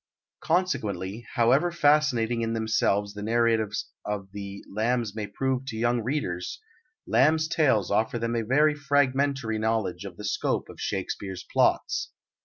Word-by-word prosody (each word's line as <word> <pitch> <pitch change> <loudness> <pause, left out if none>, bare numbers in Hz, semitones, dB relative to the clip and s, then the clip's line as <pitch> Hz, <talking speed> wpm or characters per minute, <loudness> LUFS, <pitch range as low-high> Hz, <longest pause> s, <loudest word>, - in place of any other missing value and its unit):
Consequently, 110 - -1
however 130 +9 +3
fascinating 145 -7 +2
in 115 0 -1
themselves 105 -2 +1
the 105 - -7
narratives 110 -1 +1 0.2
of 100 -2 -4
the 100 -1 -7
Lambs 115 +1 -1
may 105 -2 -3
prove 130 +4 -2
to 110 - -4
young 120 +1 +1
readers, 110 -8 -3 0.5
Lamb's 155 +4 +3
Tales 135 - +2
offer 110 +3 +1
them 115 0 -2
a 115 - +1
very 145 +7 +3
fragmentary 140 -5 +1
knowledge 110 -5 -1
of 100 - -8
the 105 - -7
scope 100 - -1
of - - -12
Shakespeare's 95 -1 -4
plots. - - +2
115 Hz, 140 wpm, -27 LUFS, 105-135 Hz, 0.5 s, however